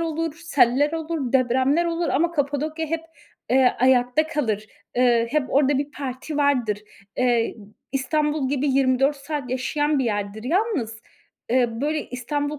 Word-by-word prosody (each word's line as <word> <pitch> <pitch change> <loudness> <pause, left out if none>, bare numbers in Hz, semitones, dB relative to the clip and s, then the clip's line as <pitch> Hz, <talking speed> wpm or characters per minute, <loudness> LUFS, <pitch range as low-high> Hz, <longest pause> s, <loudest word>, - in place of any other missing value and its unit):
olur, 325 -1 -2
seller 285 -1 +3
olur, 320 -5 -3
depremler 260 +5 +3
olur 335 0 -1
ama 335 +5 +1
Kapadokya 305 +2 -1
hep, 325 +1 -2 0.5
eee, 255 0 +4
ayakta 255 +4 +3
kalır. 220 -9 -2 0.3
Iıı, 240 -2 +3
hep 305 +2 +2
orada 280 0 +3
bir 285 +1 -3
parti 275 +2 -5
vardır. 255 -8 +1 0.4
Eee, 240 -2 +1 0.4
İstanbul 295 +1 0
gibi 285 +1 0
24 270 +1 +2
saat 280 -2 -5
yaşayan 290 +3 0
bir 265 - +1
yerdir. 205 -1 -3
Yalnız, 295 - -1 0.5
ııı, 240 -2 +1
böyle 300 +2 -1
İstanbul 290 +4 -3
275 Hz, 140 wpm, -23 LUFS, 250-300 Hz, 0.5 s, eee